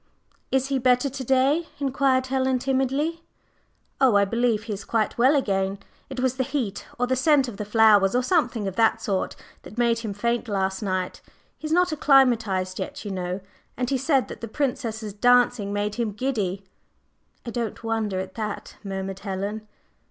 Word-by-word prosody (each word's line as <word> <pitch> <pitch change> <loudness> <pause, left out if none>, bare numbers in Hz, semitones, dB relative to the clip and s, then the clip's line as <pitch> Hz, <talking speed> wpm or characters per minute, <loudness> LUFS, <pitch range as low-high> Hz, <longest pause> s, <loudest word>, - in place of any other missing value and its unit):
"Is 265 0 +1
he 270 -1 +1
better 250 +2 +2
to 270 0 -5
day?" 270 +6 +2
inquired 270 -2 +1
Helen 260 0 +1
timidly. 270 +5 0 0.8
"Oh, 255 -5 +5
I 200 0 +5
believe 230 0 +1
he 225 -2 -4
is 200 - -6
quite 220 -2 0
well 260 +5 +4
again. 195 -6 0 0.3
It 265 -1 -6
was 260 0 0
the 260 - +1
heat 240 -7 -3
or 245 - +1
the 260 +1 0
scent 275 0 +3
of 225 -5 -7
the 210 - -4
flowers, 210 -2 +5
or 250 - +2
something 250 - +1
of 190 - -4
that 225 -1 +3
sort, 195 -2 -2 0.3
that 215 - -13
made 235 -1 +2
him 215 -4 -5
faint 235 +3 -1
last 190 -1 -1
night. 185 -3 -2 0.4
He 310 - -5
is - - -5
not 360 +1 +3
acclimatized 230 -11 +3
yet, - - -5
you 205 - -4
know. 180 0 -3 0.4
And 250 0 -1
he 270 - +2
said 270 -1 +2
that - - -9
the 230 - -4
Princess's 225 -5 -3
dancing 245 -2 +3
made 205 0 -1
him 215 -3 -1
giddy." 205 -6 -2 0.8
"I 235 - -4
don't 230 -1 -4
wonder 220 -4 -1
at 190 0 -5
that," 215 -2 -5
murmured 195 -1 -4
Helen. 205 +2 -4
235 Hz, 180 wpm, -25 LUFS, 205-260 Hz, 0.8 s, Oh